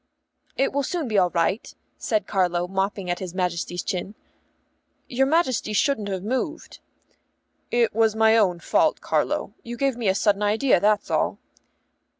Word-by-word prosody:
"It 270 - +1
will 285 - +1
soon 315 +1 -3
be 215 -3 +2
all 180 -1 +3
right," 175 +5 -1 0.3
said 215 -4 0
Carlo, 180 -3 0
mopping 195 0 -2
at 175 - -2
his 185 -2 -7
Majesty's 175 -1 -2
chin. 195 +1 -4 0.9
"Your 265 +2 +1
Majesty 270 -8 +1
shouldn't 220 -4 +1
have 190 -2 -3
moved." 260 +8 -3 0.9
"It 235 -2 +2
was 220 0 +2
my 220 0 +4
own 185 -6 +2
fault, - - +2
Carlo; - - -1
you 240 0 -7
gave 275 -1 +1
me 235 -4 -2
a 190 - +3
sudden 205 0 +2
idea, 215 +3 +3
that's 210 +2 +1
all." - - 0
210 Hz, 155 wpm, -24 LUFS, 190-240 Hz, 0.9 s, my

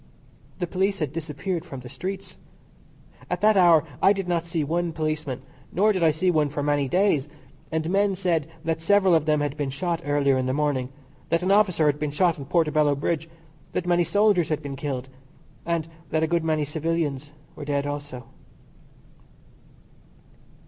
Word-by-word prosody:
The 180 - -1
police 195 +3 0
had 155 -5 -3
disappeared 165 +2 -3
from 135 -7 -8
the 125 - -10
streets. 185 +8 -6 0.9
At - - -2
that 215 0 +5
hour 170 -5 +6 0.2
I 195 - +6
did 195 -2 -4
not 170 -1 0
see 165 -2 -1
one 170 +3 -1
policeman, 155 -4 -3 0.3
nor 210 +4 +3
did 185 - -2
I 165 - +5
see 160 +4 +1
one 155 -3 +2
for 145 0 -3
many 145 -1 +1
days, 165 -4 +2 0.4
and 160 0 -1
men 195 +2 +2
said 175 -5 0 0.2
that 160 0 -1
several 195 0 +4
of 160 -2 +3
them 150 -1 +3
had 145 -1 -2
been 145 -2 -2
shot 165 +5 -2
earlier 145 -2 +2
in 130 - -1
the 130 - 0
morning; 145 -4 0 0.4
that 165 +1 +1
an 185 - +1
officer 195 -6 +4
had 145 0 +2
been 150 0 -1
shot 165 +2 +1
on 140 - -6
Portobello 155 -2 +2
Bridge, 160 +3 -2 0.4
that 180 - -1
many 175 0 +3
soldiers 200 0 +3
had 155 - -1
been 140 -1 -5
killed, 135 -2 -4 0.6
and 170 -2 0 0.2
that 160 +1 +1
a - - +2
good 170 0 +1
many 155 -2 +1
civilians 150 -2 -2 0.3
were 150 - -7
dead 140 -1 -1
also. 145 -3 -5
160 Hz, 180 wpm, -25 LUFS, 145-175 Hz, 0.9 s, hour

